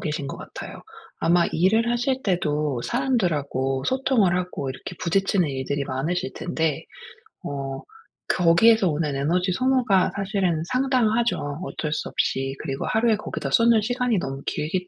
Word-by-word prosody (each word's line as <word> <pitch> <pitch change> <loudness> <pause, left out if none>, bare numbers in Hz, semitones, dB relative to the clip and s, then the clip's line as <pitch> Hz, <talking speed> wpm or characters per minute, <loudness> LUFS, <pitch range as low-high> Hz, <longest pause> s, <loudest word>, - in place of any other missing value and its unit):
계신 150 -2 -3
것 - - -6
같아요. - - -9 0.4
아마 170 +1 +3
일을 220 +8 +2
하실 255 +2 0
때도 150 - 0
사람들하고 150 - 0
소통을 255 -8 +2
하고 180 -7 -3
이렇게 130 +7 -8
부딪히는 185 -1 +1
일들이 140 +1 -2
많으실 175 +9 -2
텐데 160 -4 -2 0.6
어 135 -1 -4 0.5
거기에서 185 +4 +4
오는 150 -1 -1
에너지 180 +7 +1
소모가 250 -4 +2
사실은 195 -5 0
상당하죠 245 -3 +2 0.3
어쩔 155 -4 -3
수 - - -3
없이. 135 +1 -1
그리고 135 -3 -3
하루에 220 0 +2
거기다 210 - -5
쏟는 230 -1 +5
시간이 245 -1 0
너무 135 -3 -5
길기 180 +4 -2
180 Hz, 330 characters per minute, -24 LUFS, 150-225 Hz, 0.6 s, 쏟는